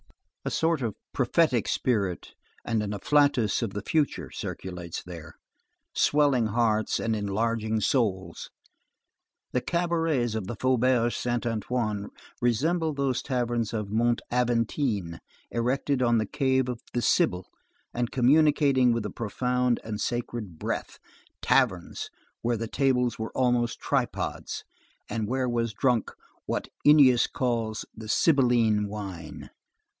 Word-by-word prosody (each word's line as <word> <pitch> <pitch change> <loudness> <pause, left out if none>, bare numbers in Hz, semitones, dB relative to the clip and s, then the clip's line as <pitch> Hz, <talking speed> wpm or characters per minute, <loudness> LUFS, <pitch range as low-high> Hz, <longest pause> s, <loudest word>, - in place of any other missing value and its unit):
A - - -2
sort 160 -2 +1
of 115 -4 -2 0.2
prophetic 125 -1 +2
spirit 100 - -1 0.3
and 115 -2 0
an 105 -1 -3
afflatus 130 0 +2
of 110 -4 -2
the 105 - -3
future 155 +2 0
circulates 90 -2 -6
there, 85 -4 -10 0.6
swelling 140 -6 +3
hearts 110 -1 +1
and 115 -1 0
enlarging 110 +2 -1
souls. 95 -7 -1 1.0
The 125 - 0
cabarets 165 -9 0
of 110 -4 -3
the 120 - -4
Faubourg 125 0 +2
Saint 120 0 -2
Antoine 110 -2 -2 0.3
resemble 155 +7 +1
those 135 -2 0
taverns 120 -4 -1
of 105 -3 -3
Mont 120 +2 +1
Aventine 115 - 0 0.3
erected 130 +3 0
on 120 -2 +3
the 110 - +1
cave 130 +2 +1
of 125 -2 -4
the 120 - -1
Sibyl 90 0 +2 0.5
and 120 -1 -1
communicating 140 -1 +4
with 115 -2 0
the 105 - -4
profound 125 +2 0
and 110 -1 -5
sacred 120 -7 -3
breath; - - -4 0.5
taverns - - +1 0.3
where 120 0 0
the 115 +1 -3
tables 125 -2 +1
were 110 - -4
almost 120 -2 +1
tripods, - - -2 0.4
and 110 0 -2
where 130 +2 0
was 115 -2 -1
drunk 125 0 +1 0.4
what - - -2
Ennius 140 -5 +6
calls 115 -4 -2
the 110 -1 -9
sibylline 120 -8 +3
wine. 95 -6 -7
120 Hz, 125 wpm, -27 LUFS, 110-130 Hz, 1.0 s, Ennius